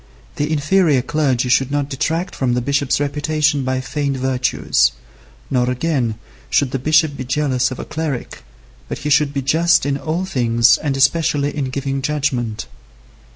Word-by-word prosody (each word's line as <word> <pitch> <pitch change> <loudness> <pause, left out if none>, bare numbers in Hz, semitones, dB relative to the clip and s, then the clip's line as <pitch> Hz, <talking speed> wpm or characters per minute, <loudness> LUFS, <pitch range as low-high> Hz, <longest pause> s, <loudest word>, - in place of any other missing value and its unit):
The 145 +1 -1
inferior 155 -2 +2
clergy 130 -3 0
should 130 +1 +3
not 145 -1 -1
detract 160 +6 -2
from 125 -2 0
the 125 - 0
bishop's 140 +2 0
reputation 145 0 0
by 130 0 -1
feigned 135 +1 -2
virtues; 130 -1 +1 0.6
nor 125 -2 +1
again, 125 -4 -1 0.3
should 140 -3 +1
the 135 - -2
bishop 155 +2 +2
be 130 - -5
jealous 130 -1 0
of 130 - -6
a - - -6
cleric, 155 -5 -4 0.5
but - - -4
he 150 - -3
should 150 0 +3
be 140 -1 -3
just 165 +5 +3
in 140 -1 0
all 160 +6 -2
things 120 -7 +3
and 140 -3 -2
especially 145 +1 +2
in 145 -2 -1
giving 135 +1 -3
judgment. 135 -7 -2
140 Hz, 160 wpm, -19 LUFS, 130-150 Hz, 0.6 s, should